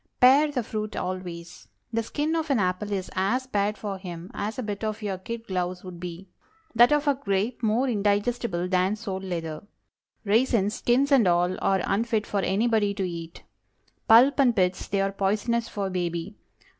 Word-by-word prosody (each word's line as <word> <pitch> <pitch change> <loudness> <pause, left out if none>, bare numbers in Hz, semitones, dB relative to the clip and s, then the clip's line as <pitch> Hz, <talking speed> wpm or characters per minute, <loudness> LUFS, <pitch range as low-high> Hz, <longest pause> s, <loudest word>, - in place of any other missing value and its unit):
Pare 280 +4 +6
the 255 -4 -1
fruit 215 0 -4
always. 175 -2 -6 0.3
The 230 - +1
skin 295 +7 -2
of 320 -1 -2
an 275 - +3
apple 185 +1 -1
is 190 -2 -3
as 200 +8 0
bad 210 -3 -1
for 200 -2 -5
him 175 -1 -8
as 210 +5 -4
a 255 - -3
bit 205 -1 -5
of 215 0 -3
your 195 -3 -3
kid 230 +3 -6
gloves 180 -2 -3
would 180 -2 -9
be; 180 +2 -7 0.5
that 240 +3 +6
of 295 0 +2
a 285 - +5
grape 220 -2 -2
more 230 +4 +1
indigestible 205 -3 0
than 185 +2 +1
sole 205 -4 -5
leather. 165 -4 -4 0.6
Raisins—"skins 235 +4 +2
and 255 -8 +5
all"—are 180 +2 +1
unfit 220 0 0
for 205 - -1
anybody 205 +1 +1
to 195 -2 -1
eat. 170 -1 -8 0.6
Pulp 250 +6 +6
and 250 -4 +4
pits, 185 -1 0
they 195 0 0
are 195 0 0
poisonous 215 +4 0
for 200 -2 -3
baby. 175 +1 -3
205 Hz, 170 wpm, -26 LUFS, 185-235 Hz, 0.6 s, Pare